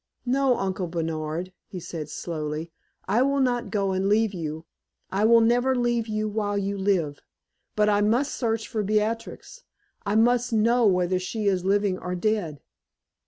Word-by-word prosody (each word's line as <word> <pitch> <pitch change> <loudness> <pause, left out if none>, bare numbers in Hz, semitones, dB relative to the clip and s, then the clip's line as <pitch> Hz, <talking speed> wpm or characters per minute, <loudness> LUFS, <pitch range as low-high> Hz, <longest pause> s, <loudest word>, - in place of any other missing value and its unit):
"No, 260 0 +2
Uncle 190 -1 -2
Bernard," 165 +1 -3
he 185 - -7
said, 160 -3 -6
slowly, 155 0 -4 0.4
"I 210 +6 +2
will 275 +1 +2
not 245 -2 0
go 200 -2 0
and 190 +1 0
leave 215 0 +2
you 160 -2 -5 0.5
I 200 +3 +1
will 230 +1 +6
never 245 +3 +3
leave 240 -2 0
you 215 0 -1
while 205 -1 -1
you 200 0 -1
live. 190 -7 0 0.6
But 210 0 +3
I 205 -1 +3
must 240 +7 +1
search 225 -3 -1
for 220 - -2
Beatrix 220 - -2 0.4
I 205 0 -1
must 240 +2 +3
know 230 +2 +3
whether 180 -1 +2
she 210 +4 -4
is 190 -3 +1
living 200 -1 +1
or 180 0 -4
dead. 180 -7 -1
205 Hz, 165 wpm, -25 LUFS, 180-230 Hz, 0.6 s, will